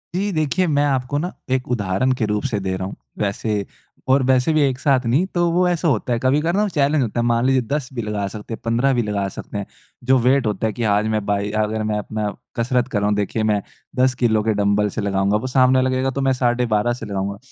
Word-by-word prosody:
जी। 200 +2 0
देखिए 160 +3 0
मैं 145 - +4
आपको 135 0 0
ना 175 +4 -2 0.2
एक 130 -1 0
उदाहरण 110 +3 0
के 110 - +1
रूप 105 0 -1
से 105 - 0
दे 95 -1 -2
रहा 95 0 -3
हूँ। - - -8 0.2
वैसे 105 0 -1 0.4
और 135 0 +4
वैसे 130 +3 +3
भी 155 - +3
एक 135 -3 +1
साथ 130 -3 +2
नहीं 135 +10 +2
तो 175 0 +2
वो 180 +1 +2
ऐसा 175 -1 0
होता 125 -2 +1
है 115 - 0
कभी-कभार 150 +6 +2
ना 210 - +2
वो 210 - 0
चैलेंज़ 145 -2 +2
होता 120 +1 -2
है। 120 - +1
मान 120 0 +2
लीजिए 130 -1 +3
10 145 -3 -1
भी 120 - -3
लगा 105 -2 -2
सकते 105 +3 -7
हैं - - -6
15 120 +4 +2
भी 120 - +1
लगा 100 -2 -1
सकते 105 - -7
हैं। 100 - -3 0.4
जो 130 +1 +4
वेट 130 +2 +3
होता 105 +1 -1
है 110 - -3
कि 120 - -4
आज 105 +1 +2
मैं 105 -2 -2
भाई 100 0 -1
अगर 110 +1 -2
मैं 105 - 0
अपना 105 0 -3 0.3
कसरत 125 +1 0
कर 105 -6 -1
रहा 105 - 0
हूँ 105 - +1
देखिए 105 +2 -1
मैं 105 -1 +1 0.4
10 130 0 +4
किलो 110 -2 +3
के 110 -1 +1
डँबल 100 +1 +2
से - - 0
लगाऊँगा 100 +1 +1
वो 130 - -4
सामने 130 0 +4
लगेगा 130 0 0
तो 140 - -3
मैं 135 -1 +2
साढ़े 125 -1 +1
12 110 +1 +1
से 120 - -7
लगाऊँगा। 100 0 -3
120 Hz, 255 wpm, -21 LUFS, 105-135 Hz, 0.4 s, मैं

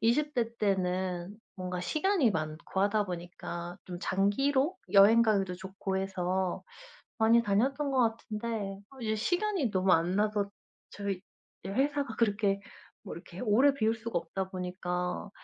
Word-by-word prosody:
20 290 +7 +2
대 230 -1 -1
때는 185 -1 -1 0.2
뭔가 180 -1 -4
시간이 310 - +2
많고 155 +2 -3
하다 205 +1 +2
보니까 175 0 -6
좀 175 -1 -6
장기로 270 - +1 0.2
여행 210 +4 +8
가기도 195 -5 +1
좋고 190 +1 -4
해서 190 -1 -1 0.6
많이 230 +1 +5
다녔던 270 +8 +1
것 235 -4 +2
같은데 215 -3 -4 0.2
이제 220 -2 -1
시간이 355 - 0
너무 185 -1 +2
안 170 +2 +3
나서 210 -1 +1 0.4
저희 200 -2 -3 0.4
예 190 - -4
회사가 280 +1 0
그렇게 205 -3 +1 0.4
뭐 205 - -7
이렇게 170 +1 -10
오래 250 +5 +4
비울 225 -3 +1
수가 230 -4 -2
없다 190 +3 -4
보니까 180 0 -3
200 Hz, 275 characters per minute, -30 LUFS, 185-230 Hz, 0.6 s, 여행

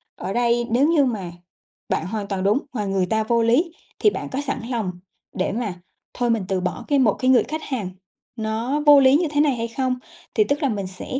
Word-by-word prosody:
ở 195 - -5
đây 240 0 +1
nếu 260 +6 +4
như 310 -4 +4
mà 200 -8 -3 0.6
bạn 160 - 0
hoàn 205 0 -4
toàn 195 -2 -2
đúng 210 +6 +3
mà 210 -4 -2
người 195 -1 0
ta 220 +3 0
vô 235 +1 +1
lý 255 +10 +2 0.3
thì 420 - +5
bạn - - -5
có 270 +2 -2
sẵn 275 -3 -3
lòng 225 -7 -1 0.4
để 185 - -1
mà 215 -3 -2 0.4
thôi 245 -1 -1
mình 225 -4 +1
từ 190 -2 -1
bỏ 180 -3 -3
cái 285 -2 +2
một 220 -6 +4
cái 255 - 0
người 255 - +6
khách 315 +1 -5
hàng 230 -9 -3 0.5
nó 225 +6 -2
vô 290 -1 +9
lý 265 0 +6
như 335 +2 +2
thế 290 0 +1
này 285 -4 +2
hay 230 0 -3
không? 255 +2 -1 0.4
Thì 430 - +5
tức 290 -3 -1
là 280 - +2
mình 200 -4 -3
sẽ 190 +7 -5
235 Hz, 235 wpm, -22 LUFS, 205-275 Hz, 0.6 s, vô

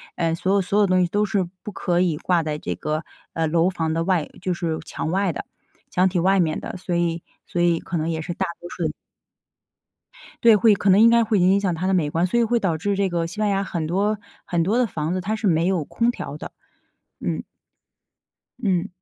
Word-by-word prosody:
呃， 165 -2 0
所 185 +3 0
有 200 - +3
所 195 +3 0
有 205 - +4
东 185 0 +3
西 - - +1
都 205 +3 +1
是 200 -2 0 0.2
不 210 - -6
可 175 -1 0
以 175 -4 +2
挂 175 +1 +1
在 155 -1 -2
这 90 -11 -4
个， 155 - -3 0.3
呃， 165 - 0
楼 165 +3 +3
房 160 -3 -2
的 165 +1 0
外 180 -5 +1
就 185 0 -1
是 165 -2 -2
墙 160 - -4
外 195 0 +1
的， - - -5 0.5
墙 185 +1 +3
体 180 -1 0
外 190 +2 +3
面 160 -3 +1
的， - - -6
所 180 -1 -3
以 170 -1 0 0.2
所 175 - -2
以 170 -1 +3
可 180 - -4
能 160 +1 -1
也 160 -1 -2
是 175 +2 -4
大 190 - -1 0.2
多 175 - -8
数 175 - -5
人 155 - -1 1.5
对， 230 -2 +8
会 210 +1 +5
可 200 +1 0
能 190 +2 +6
应 230 - +8
该 235 0 +5
会 215 -2 +1
影 185 +2 +4
响 195 -3 0
它 180 +3 -2
的 190 - +2
美 165 -5 +2
观。 165 +4 +1
所 235 +6 +1
以 - - +4
会 235 +1 +2
导 175 -7 0
致 200 +5 -1
这 195 -1 +1
个 170 -1 -1
西 195 +6 -9
班 210 -1 +2
牙 195 0 +1
很 170 -4 -3
多， 200 +5 +1 0.3
很 170 -2 0
多 205 +7 +1
的 250 - +3
房 160 -3 -3
子， 185 - -1
它 210 +4 -1
是 220 -1 -1
没 165 -1 +2
有 185 -4 +1
空 235 +9 +1
调 145 -10 -7
的。 - - -8 0.7
嗯。 - - -2 1.2
嗯。 190 -5 0
180 Hz, 260 characters per minute, -23 LUFS, 165-200 Hz, 1.5 s, 对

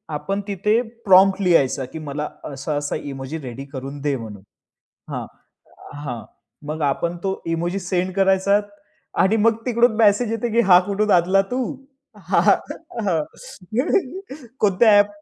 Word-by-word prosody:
आपण 195 +7 -2
तिथे 210 +4 +1 0.2
प्रॉम्प्ट 195 +1 +6
लिहायचा, 140 -7 +2
की 160 +5 -9
मला 150 0 -4 0.2
असा-असा 145 +1 -3
इमोजी 135 +2 -6
रेडी 135 0 -7
करून 135 +2 -6
दे 145 -1 0
म्हणून 110 -5 -8 0.7
हां. - - -4 0.8
हां. 120 -5 -5 0.4
मग 155 +1 -4
आपण 170 +5 0
तो 190 0 -2
इमोजी 170 +4 -1
सेंड 185 0 -2
करायचा 195 +1 +3 0.6
आणि 195 +4 +3
मग 230 -1 +4
तिकडून 240 -1 +3
मेसेज 220 +1 +3
येतो, 230 +1 -1
की 235 - +3
"हा 180 -3 +7
कुठून 210 +1 0
आणला 185 +2 +4
तू? 255 +1 0 3.0
कोणत्या 210 +2 +4
ॲप?" 205 - +4
180 Hz, 125 wpm, -21 LUFS, 145-200 Hz, 3.0 s, हा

